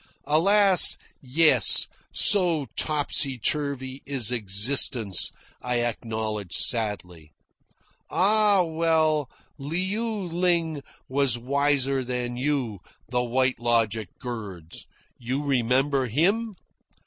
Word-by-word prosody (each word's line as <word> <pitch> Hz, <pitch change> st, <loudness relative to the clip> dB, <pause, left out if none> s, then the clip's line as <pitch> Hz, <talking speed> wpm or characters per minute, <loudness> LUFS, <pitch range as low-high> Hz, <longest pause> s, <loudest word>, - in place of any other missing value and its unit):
"Alas, 195 Hz, +4 st, +5 dB, 0.2 s
yes, 135 Hz, -, +4 dB, 0.2 s
so 175 Hz, -7 st, +3 dB
topsy 145 Hz, -3 st, -1 dB
turvy 135 Hz, 0 st, -2 dB
is 130 Hz, -5 st, 0 dB
existence," 110 Hz, -1 st, +3 dB, 0.3 s
I 125 Hz, -1 st, -2 dB
acknowledge 110 Hz, -4 st, -4 dB
sadly. 90 Hz, -9 st, -2 dB, 0.8 s
"Ah, 205 Hz, -1 st, +2 dB
well, 160 Hz, -3 st, 0 dB, 0.3 s
Liu 190 Hz, +10 st, -3 dB
Ling 170 Hz, -5 st, -2 dB, 0.3 s
was 135 Hz, -3 st, 0 dB
wiser 135 Hz, +1 st, -1 dB
than 125 Hz, -1 st, -4 dB
you," 130 Hz, -6 st, -2 dB, 0.3 s
the 125 Hz, 0 st, -1 dB
White 130 Hz, +1 st, -1 dB
Logic 115 Hz, -4 st, -1 dB
girds. 100 Hz, -9 st, -9 dB, 0.3 s
"You 130 Hz, +4 st, -4 dB
remember 135 Hz, 0 st, 0 dB
him?" 195 Hz, -, -1 dB
135 Hz, 90 wpm, -24 LUFS, 120-160 Hz, 0.8 s, Alas